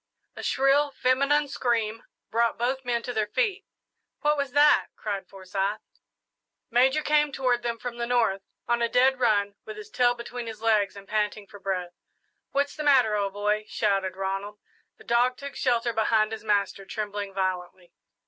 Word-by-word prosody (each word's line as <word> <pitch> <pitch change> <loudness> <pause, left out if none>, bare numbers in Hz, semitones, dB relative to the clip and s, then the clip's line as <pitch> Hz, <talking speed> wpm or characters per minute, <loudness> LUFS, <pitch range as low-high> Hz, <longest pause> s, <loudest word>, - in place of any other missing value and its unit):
A - - -7
shrill 275 +2 +3
feminine 280 +3 +2
scream 230 -4 -1 0.3
brought 230 0 +1
both 260 +3 -1
men 240 -2 -1
to 245 - -4
their 215 -2 0
feet. 415 - -1 0.5
"What 300 0 +3
was 280 -3 -3
that?" 295 +1 +5
cried 200 -2 -4
Forsyth. 195 +2 -3 0.9
Major 265 +5 +3
came 295 -1 +3
toward 255 -3 +1
them 235 -1 -2
from 235 +1 -6
the 235 0 -2
north, 230 -6 +2 0.3
on 240 0 +1
a 235 - +2
dead 255 +2 +3
run, 205 -4 +2
with 425 - -8
his 425 0 -10
tail 245 -1 +3
between 240 0 -7
his 220 -2 -7
legs 215 -4 +2
and 200 0 -11
panting 210 -1 -1
for 205 0 -13
breath. 185 -2 -3 0.6
"What's 285 +1 0
the 310 - -5
matter, 255 -7 +4
old 200 -1 -1
boy?" 210 +1 0
shouted 195 -3 0
Ronald. 195 +2 -3 0.4
The - - -16
dog 245 +2 +2
took 280 0 -8
shelter 235 -2 +1
behind 220 0 +2
his 220 - -6
master, 200 -2 0
trembling 205 0 -4
violently. 185 -2 -3
230 Hz, 170 wpm, -26 LUFS, 205-255 Hz, 0.9 s, that